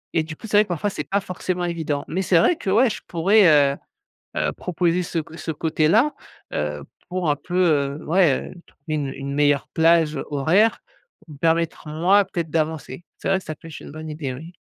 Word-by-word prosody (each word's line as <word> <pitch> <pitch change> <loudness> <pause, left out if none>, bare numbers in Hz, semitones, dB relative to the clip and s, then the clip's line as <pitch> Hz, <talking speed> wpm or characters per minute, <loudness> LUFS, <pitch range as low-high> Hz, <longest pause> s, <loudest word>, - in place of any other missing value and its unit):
et 165 - +4
du 155 0 -7
coup - - -12
c'est 210 -1 +2
vrai 210 - +7
que - - -25
parfois 180 +4 -1
c'est 150 - -4
pas 200 +1 +1
forcément 180 -1 -3
évident. 160 -4 -2
Mais 185 - -2
c'est 185 -2 +3
vrai, 170 - +4
que 200 - -5
ouais, 230 +7 +5
je 215 - -5
pourrais, 190 +4 +4 0.3
heu - - -16 0.6
heu, 75 0 +1
proposer 175 - -1
ce 165 0 -2
co 160 +1 -10
ce 160 0 -4
côté-là, 160 - +2 0.4
heu, - - -3 0.3
pour 180 -3 -1
un 145 - +2
peu, 175 +4 -6 0.4
heu, - - -12
ouais, 165 -5 +2
heu, - - -12 0.3
une 150 -3 -1
une 140 0 -5
meilleure 145 -1 +2
plage 165 -1 +3
horaire 175 +11 +2 0.4
pour - - -19
me - - -15
permettre 165 +1 0
moi, 180 +7 +3
peut-être 170 -4 -4
d'avancer. 160 -1 -2
C'est - - -4
vrai 195 0 +3
que 190 - -12
ça 155 - -5
peut-être 160 0 -11
une - - -10
bonne 155 +1 -8
idée, 150 -3 -4
oui. 160 +7 -10
165 Hz, 215 wpm, -22 LUFS, 155-185 Hz, 0.6 s, vrai